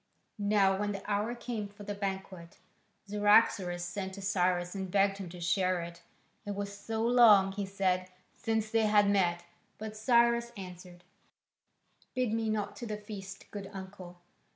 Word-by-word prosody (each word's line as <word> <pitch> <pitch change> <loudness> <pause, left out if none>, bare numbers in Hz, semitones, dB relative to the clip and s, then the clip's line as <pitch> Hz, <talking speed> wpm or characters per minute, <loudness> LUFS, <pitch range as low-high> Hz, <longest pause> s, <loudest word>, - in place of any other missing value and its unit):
Now 200 -2 +3
when 205 0 -1
the 195 - -7
hour 210 +3 0
came 235 -3 -4
for 205 +1 -13
the 205 0 -4
banquet, 190 -3 -5 0.5
Cyaxares 205 -3 +3
sent 190 +2 -4
to 200 - -8
Cyrus 180 -2 +1
and 190 -2 -4
begged 195 +1 +2
him 190 -3 -6
to 175 +1 -10
share 180 +2 +1
it: 170 0 -9 0.4
it 205 -1 -4
was 200 0 -4
so 220 +2 -3
long, 220 -5 +6
he 200 0 -4
said, 185 -1 0 0.3
since 220 -1 -1
they 225 -1 +3
had 210 -1 +5
met. 175 -4 +2 0.3
But 215 0 -6
Cyrus 235 +1 +3
answered, 180 -1 -10 1.1
"Bid 250 -4 0
me 225 -1 0
not 215 -2 -2
to 240 - -6
the 210 -1 -3
feast, 195 -2 -9
good 200 -2 -6
uncle. 190 -2 -9
200 Hz, 160 wpm, -31 LUFS, 185-215 Hz, 1.1 s, long